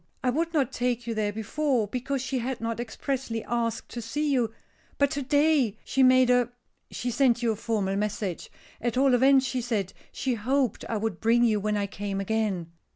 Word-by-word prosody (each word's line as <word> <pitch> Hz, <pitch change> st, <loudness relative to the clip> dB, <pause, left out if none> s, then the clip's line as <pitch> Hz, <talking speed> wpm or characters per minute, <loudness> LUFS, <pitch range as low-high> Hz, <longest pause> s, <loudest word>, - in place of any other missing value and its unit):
I 250 Hz, -, +2 dB
would 330 Hz, +5 st, -1 dB
not 275 Hz, -6 st, +1 dB
take 245 Hz, -2 st, -1 dB
you 230 Hz, -, -2 dB
there 215 Hz, -2 st, 0 dB
before, 225 Hz, +2 st, 0 dB
because 255 Hz, +4 st, -3 dB
she 260 Hz, 0 st, -2 dB
had 250 Hz, +1 st, -3 dB
not 230 Hz, 0 st, -3 dB
expressly 240 Hz, -1 st, -3 dB
asked 230 Hz, -1 st, -2 dB
to 240 Hz, -, -6 dB
see 290 Hz, +6 st, -1 dB
you. 240 Hz, -4 st, +1 dB, 0.5 s
But 280 Hz, -1 st, +3 dB
to 280 Hz, -, -2 dB
day 285 Hz, -5 st, +2 dB
she 270 Hz, -, +1 dB
made 255 Hz, -1 st, +6 dB
a 245 Hz, -1 st, +3 dB, 0.4 s
she 245 Hz, -, -3 dB
sent 245 Hz, -2 st, +2 dB
you 230 Hz, -, +3 dB
a -, -, -2 dB
formal 205 Hz, -3 st, -1 dB
message 200 Hz, -3 st, -3 dB, 0.3 s
at 240 Hz, 0 st, -1 dB
all 270 Hz, 0 st, +4 dB
events 265 Hz, +2 st, +5 dB
she 250 Hz, 0 st, -1 dB
said 220 Hz, -6 st, -2 dB, 0.2 s
she 260 Hz, -, -1 dB
hoped 250 Hz, +2 st, 0 dB
I 225 Hz, -, 0 dB
would 210 Hz, -4 st, -2 dB
bring 235 Hz, +2 st, +3 dB
you 220 Hz, -3 st, +3 dB
when 210 Hz, +1 st, 0 dB
I 200 Hz, -, 0 dB
came 200 Hz, 0 st, -4 dB
again." 195 Hz, -5 st, -1 dB
235 Hz, 200 wpm, -27 LUFS, 215-260 Hz, 0.5 s, made